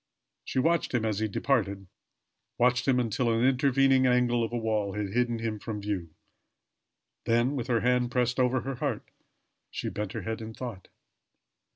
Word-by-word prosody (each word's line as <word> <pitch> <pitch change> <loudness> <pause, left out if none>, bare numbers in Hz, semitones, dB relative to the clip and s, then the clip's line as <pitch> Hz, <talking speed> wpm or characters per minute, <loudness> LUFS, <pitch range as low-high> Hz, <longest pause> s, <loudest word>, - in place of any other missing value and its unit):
She - - -5
watched 165 0 +2
him 115 -2 +1
as 105 -2 -1
he 110 - 0
departed 100 -3 0 0.7
watched 125 +1 +2
him 130 -2 +4
until 120 0 0
an 115 +2 +2
intervening 135 0 +4
angle 125 -1 +2
of 115 - -3
a 120 - -1
wall 110 -3 -1
had 105 -1 -3
hidden 120 +2 0
him 110 -2 -3
from 105 0 -5
view. 100 -5 -3 1.2
Then 120 +4 +2
with 125 -3 -3
her 120 -3 +1
hand 125 0 +2
pressed 125 0 0
over 130 0 +2
her 135 - -4
heart, 135 -5 -3 0.6
she - - -4
bent 105 -2 -4
her - - -4
head 110 0 -4
in 110 0 -7
thought. 115 -8 -7
120 Hz, 175 wpm, -28 LUFS, 110-125 Hz, 1.2 s, him